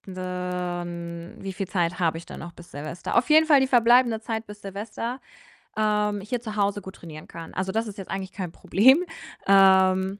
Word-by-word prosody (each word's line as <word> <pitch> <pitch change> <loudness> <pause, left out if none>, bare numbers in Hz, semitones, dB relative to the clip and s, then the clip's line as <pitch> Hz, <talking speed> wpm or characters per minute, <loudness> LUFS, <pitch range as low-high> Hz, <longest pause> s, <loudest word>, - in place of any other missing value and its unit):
wie 180 -1 -5
viel 195 0 -4
Zeit 175 -1 0
habe 165 -2 +1
ich 170 - -9
dann - - -9
noch 170 - -8
bis 170 0 -15
Silvester? 155 +4 -5
Auf 240 +4 +2
jeden 315 +1 +6
Fall, 290 -4 +6
die 265 - +2
verbleibende 240 -2 +4
Zeit 220 0 -4
bis 210 0 -11
Silvester, 220 +6 -5 0.5
ähm, 210 -1 +1
hier 235 +5 -3
zu 220 -3 -7
Hause 205 0 0
gut 190 0 -10
trainieren 155 -2 -11
kann. 165 -1 -10
Also, 190 +1 -2
das 225 +1 0
ist 210 - -8
jetzt 195 - -8
eigentlich 190 -1 -4
kein 185 -3 -5
Problem. 265 - +4 0.4
Ähm 190 0 +5
195 Hz, 190 wpm, -25 LUFS, 180-220 Hz, 0.5 s, jeden